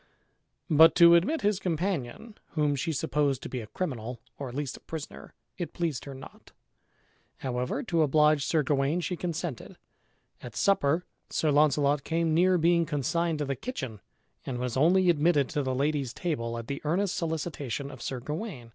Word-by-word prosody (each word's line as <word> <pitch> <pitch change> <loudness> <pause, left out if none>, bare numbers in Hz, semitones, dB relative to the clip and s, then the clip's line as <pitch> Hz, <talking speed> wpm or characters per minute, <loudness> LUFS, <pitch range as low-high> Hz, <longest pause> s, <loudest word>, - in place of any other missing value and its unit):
But 160 +1 +7
to 170 -1 +8
admit 200 - +3
his 205 -2 +1
companion, 180 - -3 0.2
whom 150 -2 +1
she 140 +4 -2
supposed 140 -2 0
to - - -6
be 125 - -4
a 110 - -9
criminal, 125 - -4 0.2
or 140 -2 -4
at 120 - -9
least 145 -2 -3
a - - -11
prisoner, 160 -2 -8 0.2
it 175 - -4
pleased 165 -6 -2
her 140 -1 -7
not; 130 - -13 0.8
however, 125 - -2
to 170 -9 +1
oblige 150 0 +4
Sir 155 +1 +1
Gawain, 140 +4 +1
she 180 - -2
consented. 170 - -5 0.6
At 120 -3 -9
supper 170 - +2 0.2
Sir 155 - +1
Launcelot 145 -1 +3
came 165 -1 0
near 180 +3 +4
being 170 +1 +3
consigned 165 +3 0
to 150 - -2
the 135 0 -2
kitchen 130 - -6 0.4
and 125 - -4
was 125 -1 -3
only 180 +7 +4
admitted 150 -3 +2
to 150 - -1
the 130 -1 -1
lady's 140 -2 -1
table 115 -9 -2
at 115 - -6
the 140 +3 -5
earnest 175 +5 0
solicitation 150 -5 -3
of 130 -3 -11
Sir 130 +1 -3
Gawain. 150 - -6
150 Hz, 175 wpm, -28 LUFS, 135-170 Hz, 0.8 s, to